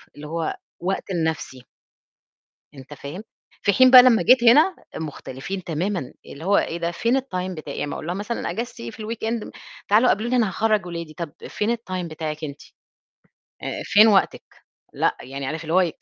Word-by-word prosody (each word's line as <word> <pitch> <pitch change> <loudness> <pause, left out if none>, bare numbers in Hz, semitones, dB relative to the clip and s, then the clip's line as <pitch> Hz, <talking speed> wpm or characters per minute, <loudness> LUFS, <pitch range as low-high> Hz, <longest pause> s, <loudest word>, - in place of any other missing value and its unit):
اللي 150 +1 -9
هو 165 0 -3 0.2
وقت 190 +2 -3
لنَفْسي. 160 -7 -3 1.1
أنت 135 +2 -11
فاهم، 145 +9 -8 0.4
في 200 - +3
حين 255 +5 +6
بقى 255 -1 +11
لمّا 245 -3 +5
جيت 250 -1 +5
هنا 300 +10 +6 0.2
مختلفين 160 +4 -6
تمامًا، 170 -2 -2
اللي 155 +4 -10
هو 200 +1 +3
إيه 170 - -2
ده 170 0 -1
فين 235 +9 +1
الTime 185 -7 -4
بتاعي، 155 -5 -7
يعني - - -2
أمّا 145 - -4
أقول - - -7
لها 175 - -2
مثلًا 210 +4 -3
إجازتي 235 +1 -5
إيه - - -5
في 220 - -10
الweekend 225 0 -3
م - - -9 0.4
تعالوا 220 +5 +5
قابلوني 235 +5 +1
أنا 225 -5 +3
هاخرّج 215 0 +1
ولادي، 170 -3 -6
طَب 165 -3 -6 0.2
فين 220 +3 0
الTime 185 -5 -5
بتاعِك 155 0 -5
أنتِ؟ 140 -1 -7 1.0
آآ - - -4
فين 215 +2 +6
وقتِك؟ 195 -3 +3 0.5
لأ، - - 0
يعني 135 +1 -6
عارف 160 +4 -4
اللي 160 +1 -3
هو 185 - +6
إيه، 170 -4 0
185 Hz, 185 wpm, -23 LUFS, 155-225 Hz, 1.1 s, بقى